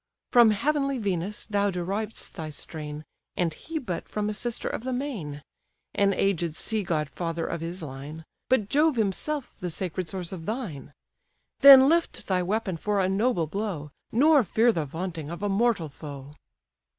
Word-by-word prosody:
From 240 -2 +7
heavenly 275 +5 +1
Venus 200 -2 -2
thou 205 -1 +1
deriv'st 195 +4 -3
thy 160 -4 -5
strain, 150 0 -6 0.3
And 170 -3 +1
he 320 - -6
but 190 - -4
from 210 0 -1
a - - -4
sister 235 +2 -2
of - - -3
the 260 - -2
main; 200 - -4 0.5
An 200 -1 +3
aged 170 -5 0
sea 220 +3 -1
god 160 -5 -1
father 165 +2 -3
of 170 - -4
his 170 +2 -5
line; 150 +3 -8 0.2
But 235 -6 +3
Jove 300 +4 +3
himself 240 +7 -1
the 180 - -3
sacred 180 0 -3
source 180 -3 -3
of 170 -4 -7
thine. 185 - -5 0.7
Then 270 -1 +10
lift 335 +2 +1
thy 185 -2 +1
weapon 195 -1 -1
for 205 +5 0
a 185 - +2
noble 195 -2 +1
blow, 165 -4 -4 0.2
Nor 290 +5 +5
fear 225 +3 +3
the 165 -8 -2
vaunting 160 0 -5
of 170 +3 -6
a 205 - +1
mortal 200 -4 +2
foe." 145 -1 -9
195 Hz, 170 wpm, -27 LUFS, 165-225 Hz, 0.7 s, Then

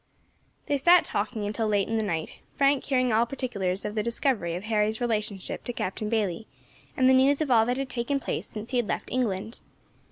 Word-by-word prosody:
They 285 - +1
sat 345 +5 +5
talking 210 +1 -2
until 215 +2 -1
late 205 -2 +1
in 225 - -2
the - - 0
night, 165 -6 -3 0.2
Frank 275 0 +3
hearing 255 -4 +1
all 230 +2 +3
particulars 200 -8 -3
of 210 - -3
the 215 - 0
discovery 230 -6 0
of 180 - -5
Harry's 215 0 0
relationship 215 -5 -2
to 245 - -3
Captain 210 +1 -3
Bayley, 215 -2 -1 0.5
and 255 - +4
the 260 - +6
news 270 +2 +4
of 305 -4 -1
all 225 -2 +5
that 245 +1 0
had 270 -1 -3
taken 255 +3 -1
place - - -3
since 220 +2 -7
he 255 - +1
had 240 -3 +1
left - - -3
England. 225 -3 -2
225 Hz, 210 wpm, -27 LUFS, 210-255 Hz, 0.5 s, the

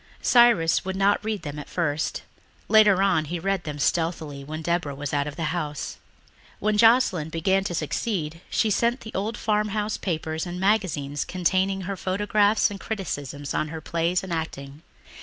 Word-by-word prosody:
Cyrus 235 -10 +5
would 190 0 -3
not 200 +2 +2
read 215 -4 -3
them 150 -1 -5
at 145 - -9
first; 155 -3 -1 0.4
later 210 -3 +6
on 175 -6 +2
he 175 +4 -3
read 195 +2 -1
them 150 -2 -4
stealthily 155 -2 -1
when 155 +3 -6
Deborah 170 -4 -1
was 145 0 -5
out 145 0 +1
of 145 - -6
the 165 0 -2
house. 150 -4 -4 0.6
When 215 +1 0
Joscelyn 215 -8 +4
began 190 +4 +1
to 175 - -2
succeed 165 0 -2
she 220 - +1
sent 235 +5 +1
to - - -11
the - - -13
old 210 +3 -2
farmhouse 210 0 0
papers 160 -2 -3
and 175 +1 -5
magazines 180 -9 0
containing 190 +2 0
her 195 +2 -4
photographs 205 +3 +2
and 200 - -7
criticisms 145 -10 -4
of 155 - -1
her 160 +1 -5
plays 170 +3 0
and 185 -2 -4
acting. 145 -3 -5
175 Hz, 175 wpm, -25 LUFS, 155-205 Hz, 0.6 s, later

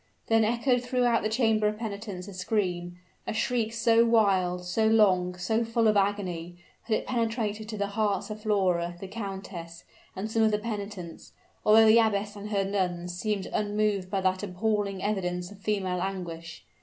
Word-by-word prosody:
Then 225 0 +3
echoed 240 +3 +2
through 250 0 -1
the 235 -3 +2
chamber 220 -2 +2
of 210 0 -1
penitence 205 -4 -6
a 200 - -8
scream, 180 -2 -2 0.3
a - - -1
shriek 225 0 0
so 230 0 +4
wild, 190 -6 +2
so 220 +5 +1
long, 185 -5 +3
so 220 +6 0
full 230 0 +1
of 215 - +4
agony, 185 -4 -1 0.3
that 220 - +2
it - - -6
penetrated 225 -3 -2
to 215 - -5
the 200 - 0
hearts 210 -1 0
of 215 0 -7
Flora, 180 -5 +1
the 195 - -7
countess, 190 -5 -7 0.3
and 205 +3 -4
some 225 - +1
of 220 - +5
the 210 - +1
penitents, 205 -5 -6 0.3
although 220 +1 +7
the 220 +1 +7
abbess 210 -2 +1
and 205 +1 -7
her 200 -2 +1
nuns 180 -3 -2
seemed 205 +1 -2
unmoved 210 -2 0
by 195 0 -1
that 185 0 +1
appalling 200 0 -1
evidence 180 -3 -2
of 200 - -13
female 190 -4 -1
anguish. 170 -4 -5
205 Hz, 175 wpm, -28 LUFS, 185-220 Hz, 0.3 s, although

